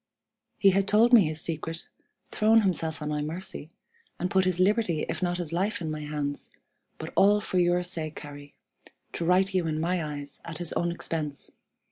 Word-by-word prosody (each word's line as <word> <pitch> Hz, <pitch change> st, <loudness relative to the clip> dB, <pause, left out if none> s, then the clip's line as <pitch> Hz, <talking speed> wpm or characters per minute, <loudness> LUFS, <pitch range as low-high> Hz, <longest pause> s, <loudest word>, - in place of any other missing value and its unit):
"He 195 Hz, -, +5 dB
had 195 Hz, +1 st, +1 dB
told 230 Hz, +4 st, +4 dB
me 220 Hz, -7 st, +8 dB
his 155 Hz, 0 st, -4 dB
secret, 165 Hz, 0 st, -4 dB, 0.4 s
thrown 220 Hz, +1 st, +4 dB
himself 165 Hz, -6 st, -1 dB
on 150 Hz, -, -3 dB
my 150 Hz, 0 st, -1 dB
mercy, 155 Hz, 0 st, -5 dB, 0.5 s
and 180 Hz, +1 st, -2 dB
put 190 Hz, -1 st, +3 dB
his 185 Hz, -1 st, 0 dB
liberty 185 Hz, -4 st, +2 dB
if -, -, -4 dB
not 175 Hz, -1 st, 0 dB
his 170 Hz, -3 st, -4 dB
life 200 Hz, +4 st, 0 dB
in 160 Hz, -3 st, -3 dB
my 155 Hz, -, -4 dB
hands, 150 Hz, -1 st, -3 dB, 0.5 s
but -, -, -7 dB
all 205 Hz, +1 st, +5 dB
for 185 Hz, -2 st, -1 dB
your 175 Hz, 0 st, +2 dB
sake, 160 Hz, -4 st, -4 dB
Harry, 145 Hz, -1 st, -11 dB, 0.6 s
to 170 Hz, -, -3 dB
right 190 Hz, +3 st, +3 dB
you 180 Hz, -3 st, +1 dB
in 155 Hz, -1 st, -1 dB
my 175 Hz, +1 st, 0 dB
eyes 145 Hz, -2 st, -6 dB
at 165 Hz, -2 st, -7 dB
his 175 Hz, -1 st, 0 dB
own 175 Hz, 0 st, 0 dB
expense. 155 Hz, -4 st, -4 dB
170 Hz, 190 wpm, -27 LUFS, 155-190 Hz, 0.6 s, me